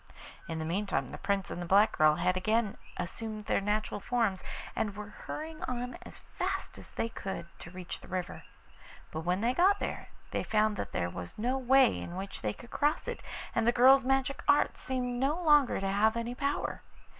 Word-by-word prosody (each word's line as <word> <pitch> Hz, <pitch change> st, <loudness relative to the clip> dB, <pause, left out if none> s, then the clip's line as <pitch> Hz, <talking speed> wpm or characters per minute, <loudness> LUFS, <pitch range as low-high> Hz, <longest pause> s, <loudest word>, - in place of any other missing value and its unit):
In 165 Hz, -1 st, -3 dB
the 160 Hz, -, -3 dB
meantime 170 Hz, -6 st, -1 dB
the -, -, -7 dB
Prince 200 Hz, -1 st, -1 dB
and 175 Hz, -, -4 dB
the -, -, -3 dB
black 200 Hz, +4 st, +5 dB
girl 155 Hz, 0 st, +5 dB
had 180 Hz, +3 st, +1 dB
again 215 Hz, +3 st, +1 dB, 0.2 s
assumed 215 Hz, +4 st, -5 dB
their -, -, +1 dB
natural 210 Hz, +1 st, -1 dB
forms, 220 Hz, -4 st, 0 dB, 0.3 s
and 205 Hz, -2 st, -1 dB
were 210 Hz, 0 st, -7 dB, 0.2 s
hurrying 310 Hz, 0 st, -5 dB
on 250 Hz, 0 st, -3 dB
as -, -, -7 dB
fast -, -, -4 dB
as -, -, -11 dB
they -, -, -1 dB
could 190 Hz, -6 st, -5 dB
to -, -, -9 dB
reach 180 Hz, -1 st, -7 dB
the -, -, -13 dB
river. 185 Hz, -1 st, -4 dB, 0.7 s
But 155 Hz, -, -3 dB
when 180 Hz, +3 st, +1 dB
they 240 Hz, +2 st, +2 dB
got 380 Hz, +6 st, +5 dB
there -, -, -4 dB, 0.2 s
they -, -, 0 dB
found 215 Hz, 0 st, +2 dB
that -, -, -4 dB
there 85 Hz, -1 st, -1 dB
was 90 Hz, -1 st, -7 dB
no 245 Hz, +5 st, 0 dB
way 265 Hz, -1 st, +5 dB
in 175 Hz, -, -6 dB
which 195 Hz, +1 st, -6 dB
they 105 Hz, -, 0 dB
could 235 Hz, -, -13 dB
cross 295 Hz, +1 st, +1 dB
it, -, -, -4 dB, 0.3 s
and 225 Hz, -, +1 dB
the -, -, +7 dB
girl's 260 Hz, +3 st, +7 dB
magic 270 Hz, +1 st, +1 dB
art 290 Hz, 0 st, +4 dB
seemed 250 Hz, -2 st, -2 dB
no 285 Hz, +6 st, +1 dB
longer 295 Hz, -6 st, +4 dB
to 195 Hz, -, -1 dB
have 215 Hz, +3 st, +3 dB
any 235 Hz, +1 st, -2 dB
power. 280 Hz, +2 st, -2 dB
215 Hz, 200 wpm, -31 LUFS, 185-255 Hz, 0.7 s, the